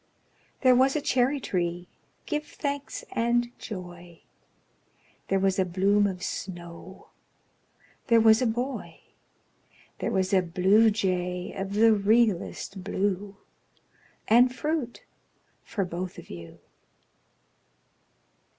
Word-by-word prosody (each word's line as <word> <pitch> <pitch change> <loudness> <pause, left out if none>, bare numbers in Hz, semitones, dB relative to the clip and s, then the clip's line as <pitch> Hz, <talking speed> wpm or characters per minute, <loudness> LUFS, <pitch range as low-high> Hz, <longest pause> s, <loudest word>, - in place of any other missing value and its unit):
There 255 -2 +6
was 265 +3 +3
a - - +2
cherry 265 0 +1
tree, 175 -5 -2 0.4
give 300 -1 -2
thanks 285 -1 -5
and 240 +1 0
joy! 175 -4 -9 1.1
There 195 - +1
was 195 0 +1
a - - +4
bloom 195 +3 +2
of 180 -2 -5
snow 175 0 -7 1.0
There 230 -3 +5
was 220 +1 +5
a 250 - +2
boy 245 +4 -4 1.0
There - - -1
was 190 0 0
a 190 - +5
bluejay 185 -1 +2
of 195 0 -5
the 225 +1 +6
realest 205 -2 +1
blue 200 0 -2 0.9
And 245 +3 +5
fruit 285 -2 -3 0.6
for 200 -4 -3
both 180 +1 -5
of - - -11
you. 85 -1 -10
200 Hz, 105 wpm, -27 LUFS, 180-240 Hz, 1.1 s, There